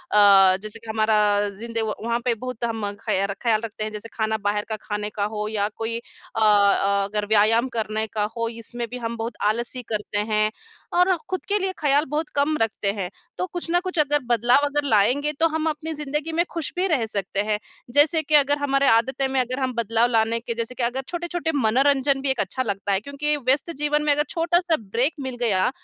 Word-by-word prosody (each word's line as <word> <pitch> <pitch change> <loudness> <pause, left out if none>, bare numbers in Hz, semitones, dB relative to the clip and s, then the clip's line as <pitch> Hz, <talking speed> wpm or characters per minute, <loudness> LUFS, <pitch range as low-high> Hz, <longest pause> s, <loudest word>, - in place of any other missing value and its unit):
जैसे 200 +1 +5
कि 225 -1 -13
हमारा 210 -2 +2
ज़िंदे 230 +3 -5
व 220 -1 -1
वहाँ 235 0 0
पे 240 - +3
बहुत 250 -2 -6
हम 225 -2 -3 0.2
खयार 195 +1 0
ख्याल 225 -2 +2
रखते 215 0 -6
हैं। 215 - -4
जैसे 215 +2 -8
खाना 220 -1 0
बाहर 205 0 +1
का 220 - -1
खाने 210 0 -3
का 205 -1 -3
हो 210 0 -3
या 205 -1 0
कोई 225 +1 -2
अ, 235 - -10
अ, 200 -1 +4
अगर 205 +1 -2
व्यायाम 220 +4 +4
करने 220 -1 -1
का 210 0 -2
हो 230 0 -1
इसमें 235 +1 -6
भी 250 - -6
हम 235 -1 -4
बहुत 225 +1 -4
आलसी 235 +4 -1
करते 210 -1 -2
हैं, 215 0 +3 0.4
और 360 +1 +4
खुद 370 - -3
के 410 +1 +1
लिए 380 0 -1
ख़याल 290 0 +3
बहुत 305 +1 -2
कम 290 +2 +2
रखते 215 -2 0
हैं। 190 -4 -4 0.3
तो 365 - -1
कुछ 350 - -3
न 350 - +4
कुछ 365 -2 -5
अगर 295 0 +3
बदलाव 240 +4 +3
अगर 290 0 0
लाएँगे 250 +8 +3
तो 330 - +5
हम 320 0 -2
अपनी 315 +1 -4
ज़िन्दगी 300 +2 -3
में 340 +1 +3
खुश 330 -3 -3
भी 370 +2 +1
रह 270 -10 +1
सकते 200 -2 -2
हैं, 210 -1 0 0.4
जैसे 315 +3 +4
कि 305 - +2
अगर 290 0 +4
हमारी 280 -1 +1
आदतें 265 +4 +2
में 265 0 0
अगर 255 +2 -3
हम 260 -1 -1
बदलाव 230 +1 +2
लाने 225 0 +2
के 235 0 -4
जैसे 235 +2 -4
कि 245 - -2
अगर 250 +3 0
छोटे-छोटे 345 -2 -3
मनोरंजन 270 +3 +2
भी 275 - -1
एक 265 - -1
अच्छा 255 +7 -1
लगता 200 -2 -2
है 195 - +2
क्योंकि 285 +5 -1
व्यस्त 275 +5 0
जीवन 295 0 +1
में 295 - +2
अगर 295 +1 +1
छोटा-सा 345 0 +2
ब्रेक 230 +8 0
मिल 260 -2 -4
गया, 200 -3 +2
235 Hz, 215 wpm, -23 LUFS, 215-290 Hz, 0.4 s, जैसे